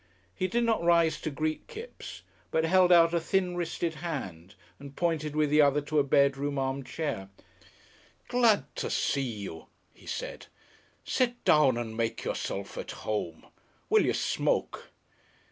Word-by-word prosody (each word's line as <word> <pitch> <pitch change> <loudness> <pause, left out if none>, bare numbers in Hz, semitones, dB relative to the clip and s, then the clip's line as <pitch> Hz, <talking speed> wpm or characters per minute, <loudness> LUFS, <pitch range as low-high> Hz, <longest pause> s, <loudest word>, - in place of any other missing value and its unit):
He 185 - -1
did 235 +6 0
not 230 -4 +1
rise 170 -1 +3
to - - -2
greet 155 +2 -3
Kipps, 470 0 -9 0.3
but 160 - +1
held 180 +1 +4
out 170 -1 +6
a 170 - +3
thin 180 +1 0
wristed 170 -1 -2
hand 95 - -5 0.2
and 140 0 -11
pointed 155 -3 -1
with 150 -1 +2
the 150 0 +6
other 145 0 +4
to 150 +1 0
a - - +4
bedroom 140 +1 +2
arm 135 0 -1
chair. 125 -10 -4 1.0
"Glad 235 -4 +2
to - - -2
see 140 - 0
you," 100 -10 -6 0.3
he - - -18
said. - - -5 0.6
"Sit 245 -1 0
down 140 -5 +5
and 115 -2 -4
make 115 0 -2
yourself 100 0 -4
at - - -6 0.2
home. 95 -7 -3 0.5
Will - - +6
you - - +1
smoke?" - - -1
150 Hz, 155 wpm, -29 LUFS, 135-175 Hz, 1.0 s, out